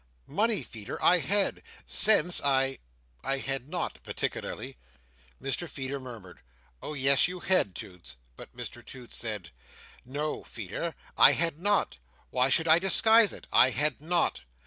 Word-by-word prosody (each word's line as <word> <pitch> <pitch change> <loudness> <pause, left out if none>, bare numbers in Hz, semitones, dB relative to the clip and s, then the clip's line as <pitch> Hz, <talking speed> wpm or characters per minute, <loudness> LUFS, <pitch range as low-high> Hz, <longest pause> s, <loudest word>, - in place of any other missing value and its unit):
Money, 220 0 0
Feeder, 110 -3 -8
I 180 - +5
had. 200 +4 0 0.2
Sense 180 -5 +4
I—I 100 - -2
had 135 0 -4
not, 175 +1 -4
particularly." - - -5 0.6
Mr 135 +6 -3
Feeder 135 0 -5
murmured, 115 -9 -11 0.4
"Oh, 150 - -6
yes, 135 +2 +4
you 180 0 -7
had, 180 - +1
Toots!" 90 - -10 0.2
But - - -13
Mr - - -8
Toots 125 -2 -11
said: 105 -6 -4 0.5
"No, 145 +4 -4
Feeder, 115 - -6 0.2
I - - +8
had 165 -2 0
not. 205 +2 0 0.3
Why 125 +1 +2
should 160 +4 +2
I 160 +1 +6
disguise 220 +3 +5
it? - - -11
I 130 - +6
had 145 +3 -1
not. 170 +2 -1
140 Hz, 140 wpm, -28 LUFS, 120-175 Hz, 0.6 s, I